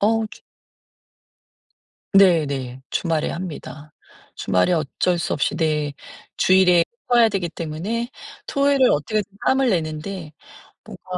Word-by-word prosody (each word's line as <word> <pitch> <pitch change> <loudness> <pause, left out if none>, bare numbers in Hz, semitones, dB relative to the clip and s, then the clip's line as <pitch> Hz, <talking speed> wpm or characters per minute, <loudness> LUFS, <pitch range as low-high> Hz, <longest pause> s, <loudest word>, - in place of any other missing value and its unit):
어. 220 +1 +2
주 - - -15 1.7
네네. 140 -9 +3
주말에 165 -3 -1
합니다. 155 -3 -7 0.4
주말에 90 - +1
어쩔 170 +3 0
수 - - -1
없이 145 - 0
네. 150 -3 0 0.4
주일에 180 -2 +5 0.3
쳐야 235 -2 +6
되기 185 -4 -2
때문에 180 +10 -4 0.4
토요일을 280 -2 +3
어떻게든 210 +8 0 0.2
짬을 265 -1 +3
내는데 160 -1 -3 0.5
뭔가 - - -12
175 Hz, 235 characters per minute, -22 LUFS, 155-210 Hz, 1.7 s, 쳐야